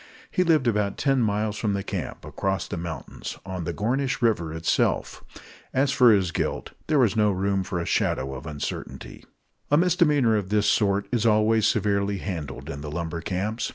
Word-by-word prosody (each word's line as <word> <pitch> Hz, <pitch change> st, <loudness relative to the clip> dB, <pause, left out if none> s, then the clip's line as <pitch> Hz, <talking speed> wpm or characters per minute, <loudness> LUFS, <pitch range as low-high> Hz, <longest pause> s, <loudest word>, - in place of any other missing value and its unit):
He 180 Hz, -, +2 dB
lived 160 Hz, -6 st, +3 dB
about 105 Hz, -3 st, 0 dB
ten 135 Hz, -2 st, +2 dB
miles 105 Hz, -1 st, 0 dB
from 105 Hz, -3 st, 0 dB
the 100 Hz, 0 st, -2 dB
camp, -, -, -5 dB
across 95 Hz, 0 st, -2 dB
the -, -, -4 dB
mountains, 85 Hz, -1 st, -6 dB
on 95 Hz, -3 st, -5 dB
the -, -, -2 dB
Gornish 130 Hz, +6 st, -1 dB
River 110 Hz, -10 st, +1 dB
itself. 80 Hz, 0 st, 0 dB, 0.5 s
As 135 Hz, +1 st, +3 dB
for 125 Hz, -4 st, +6 dB
his 95 Hz, -5 st, +2 dB
guilt, -, -, -2 dB, 0.2 s
there 155 Hz, -, +2 dB
was 120 Hz, -6 st, +3 dB
no 105 Hz, -1 st, +3 dB
room 95 Hz, 0 st, 0 dB
for 90 Hz, -1 st, -3 dB
a 85 Hz, -, -3 dB
shadow 65 Hz, -4 st, 0 dB
of 65 Hz, +4 st, -8 dB
uncertainty. 75 Hz, -2 st, -6 dB, 0.5 s
A 145 Hz, -, +4 dB
misdemeanor 150 Hz, -9 st, +3 dB
of 95 Hz, -3 st, -3 dB
this 105 Hz, 0 st, +2 dB
sort 100 Hz, -1 st, +2 dB
is 115 Hz, -2 st, +2 dB
always 110 Hz, 0 st, +3 dB
severely 100 Hz, -1 st, +1 dB
handled 80 Hz, -9 st, -5 dB
in 70 Hz, -, -6 dB
the 75 Hz, -, -6 dB
lumber 85 Hz, +1 st, -4 dB
camps. 105 Hz, +6 st, -2 dB
105 Hz, 185 wpm, -25 LUFS, 90-115 Hz, 0.5 s, for